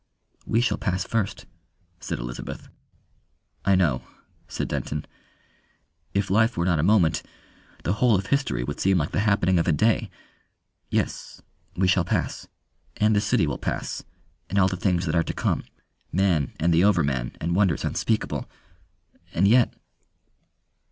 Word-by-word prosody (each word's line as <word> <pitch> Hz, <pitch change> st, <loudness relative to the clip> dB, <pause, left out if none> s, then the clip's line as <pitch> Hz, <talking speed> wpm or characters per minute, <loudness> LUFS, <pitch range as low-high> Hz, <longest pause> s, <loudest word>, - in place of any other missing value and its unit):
"We 115 Hz, -, +2 dB
shall 125 Hz, -, 0 dB
pass 95 Hz, -3 st, -1 dB
first," 110 Hz, -4 st, -2 dB, 0.5 s
said -, -, -4 dB
Elizabeth. -, -, -7 dB, 0.9 s
"I 100 Hz, 0 st, +4 dB
know," 80 Hz, -10 st, +2 dB, 0.5 s
said -, -, -3 dB
Denton. 75 Hz, 0 st, -3 dB, 1.1 s
"If 100 Hz, -1 st, 0 dB
life 115 Hz, +2 st, +3 dB
were 85 Hz, -, +1 dB
not 85 Hz, -3 st, +2 dB
a -, -, +3 dB
moment, 90 Hz, -2 st, +3 dB, 0.6 s
the 90 Hz, -, +1 dB
whole 115 Hz, +1 st, +3 dB
of 95 Hz, 0 st, -1 dB
history 130 Hz, -, 0 dB
would 75 Hz, +3 st, -5 dB
seem 95 Hz, -1 st, +3 dB
like 75 Hz, -2 st, -1 dB
the -, -, 0 dB
happening 100 Hz, -4 st, +3 dB
of 85 Hz, -, 0 dB
a -, -, +4 dB
day.... 110 Hz, +9 st, +2 dB, 0.8 s
Yes -, -, -3 dB, 0.3 s
we 95 Hz, +1 st, +2 dB
shall 90 Hz, -1 st, +3 dB
pass. -, -, -2 dB, 0.5 s
And 105 Hz, 0 st, +3 dB
the 105 Hz, -, +3 dB
city -, -, +2 dB
will -, -, -3 dB
pass, -, -, -3 dB, 0.5 s
and 100 Hz, -, -2 dB
all 95 Hz, -1 st, +5 dB
the 95 Hz, -, -2 dB
things 90 Hz, -1 st, 0 dB
that 80 Hz, -, -1 dB
are 85 Hz, -, +3 dB
to -, -, -4 dB
come. -, -, -1 dB, 0.5 s
Man 85 Hz, -6 st, +1 dB
and 85 Hz, +2 st, +2 dB
the 85 Hz, +2 st, +4 dB
Overman 70 Hz, -11 st, +2 dB
and 85 Hz, +2 st, -1 dB
wonders 95 Hz, -6 st, +2 dB
unspeakable. 110 Hz, -1 st, -1 dB, 0.9 s
And 95 Hz, +4 st, +4 dB
yet 120 Hz, +3 st, +5 dB
95 Hz, 155 wpm, -25 LUFS, 85-105 Hz, 1.1 s, all